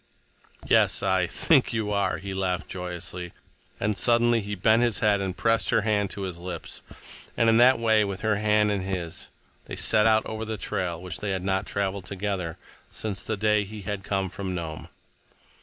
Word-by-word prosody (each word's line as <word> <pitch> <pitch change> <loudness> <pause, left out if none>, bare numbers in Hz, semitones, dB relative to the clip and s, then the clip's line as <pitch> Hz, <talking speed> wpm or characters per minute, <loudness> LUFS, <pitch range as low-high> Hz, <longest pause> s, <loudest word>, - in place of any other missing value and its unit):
"Yes, - - +4
I—think - - +2
you 110 -2 -1
are," 100 -2 0
he 100 0 -6
laughed 95 -1 -1
joyously, 90 -1 -5 0.5
and 105 +1 0
suddenly 120 +1 +3
he 105 0 -4
bent 110 +4 +3
his 120 -5 +3
head 105 -1 +2
and 95 -2 -3
pressed 115 +1 +2
her - - +3
hand 105 -2 +1
to 100 - -6
his 90 -3 -5
lips, 85 -2 -7 0.6
and 115 - +3
in 115 0 +5
that 125 +2 +6
way, 110 -2 +3
with 100 -1 -4
her 110 -2 +1
hand 105 0 +2
in 100 -2 -1
his, 90 -3 -4 0.4
they - - -6
set 110 +1 +3
out 110 0 +3
over 110 0 -4
the 110 0 -4
trail 90 -4 -2
which 90 +1 -5
they 105 - -3
had 95 -2 -2
not 95 0 0
traveled 100 -1 -2
together 95 -3 -3 0.3
since 105 -3 -3
the 110 - -3
day 105 0 +2
he 105 +1 -9
had 95 0 -4
come 95 -2 -1
from 95 -2 -4
Nome. 80 -3 -6
100 Hz, 190 wpm, -26 LUFS, 95-110 Hz, 0.6 s, that